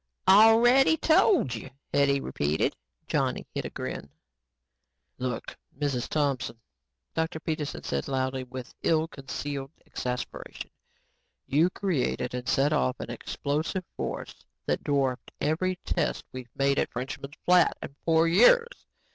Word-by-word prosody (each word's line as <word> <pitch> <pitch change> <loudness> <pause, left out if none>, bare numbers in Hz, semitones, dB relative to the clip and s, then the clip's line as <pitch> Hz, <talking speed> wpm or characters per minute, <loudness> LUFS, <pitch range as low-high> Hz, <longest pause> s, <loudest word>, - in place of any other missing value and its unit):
"Already 230 +9 +7
told 320 - +4
you," 115 +3 -6 0.2
Hetty 140 -1 +3
repeated. 75 - 0 0.3
Johnny - - -1
hid - - -3
a - - -3
grin. 70 - -6 1.1
"Look, 125 -1 -4 0.2
Mrs. 140 -4 -1
Thompson," 140 -6 -1 0.6
Dr. 160 0 -1
Peterson 155 -2 -3
said - - -2
loudly 130 -1 -1
and 125 - -10
with 130 -1 -7
ill 160 0 +2
concealed 135 -1 -5 0.2
exasperation, 125 0 -5 0.7
"you 155 +6 +3
created 160 -10 -1
and 125 0 -3
set 140 +2 +3
off 65 0 +1
an - - -5
explosive 155 +6 -3
force - - -5 0.2
that - - -1
dwarfed 135 -3 0
every 175 +5 0
test - - -1
we've 130 -2 -8
made 140 0 +2
at - - 0
Frenchman's 140 +3 -6
Flat 180 -1 +5
in 140 - -8
four 165 0 +4
years. 465 - +4
145 Hz, 130 wpm, -28 LUFS, 130-170 Hz, 1.1 s, Already